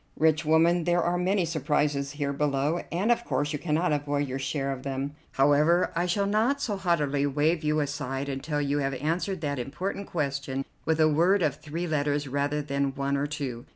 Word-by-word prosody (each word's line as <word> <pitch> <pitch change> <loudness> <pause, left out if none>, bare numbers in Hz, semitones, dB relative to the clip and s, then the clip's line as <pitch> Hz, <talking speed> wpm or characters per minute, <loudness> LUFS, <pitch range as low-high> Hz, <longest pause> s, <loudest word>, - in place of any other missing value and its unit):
"Rich 160 0 +3
woman, 165 +2 +4
there 175 -1 +2
are 175 +1 +1
many 185 +1 +1
surprises 145 -2 0
here 145 -1 -2
below, 145 +3 0
and 195 +7 +1
of 240 - +2
course 145 +2 -1
you 150 - -2
cannot 165 +2 0
avoid 145 0 -1
your 130 +1 -4
share 135 0 -2
of 135 -1 -5
them. 135 +1 -3 0.2
However, 150 +6 +3
I 175 +2 +1
shall 200 +3 +1
not 220 +8 +2
so 210 -6 -1
haughtily 150 -7 +1
wave 150 +4 +1
you 150 0 +2
aside 140 -1 -3
until 145 +2 -2
you 145 0 0
have 135 -1 -1
answered 170 +6 -2
that 145 -3 -2
important 180 +10 -4
question 140 -3 -2 0.2
with 160 0 +1
a 155 - +6
word 175 +5 +3
of 145 -3 0
three 160 +4 -4
letters 145 -2 0
rather 145 +2 -1
than 140 -1 -1
one 140 0 -1
of 140 +1 -1
two. 130 -5 -5
150 Hz, 195 wpm, -27 LUFS, 140-170 Hz, 0.2 s, a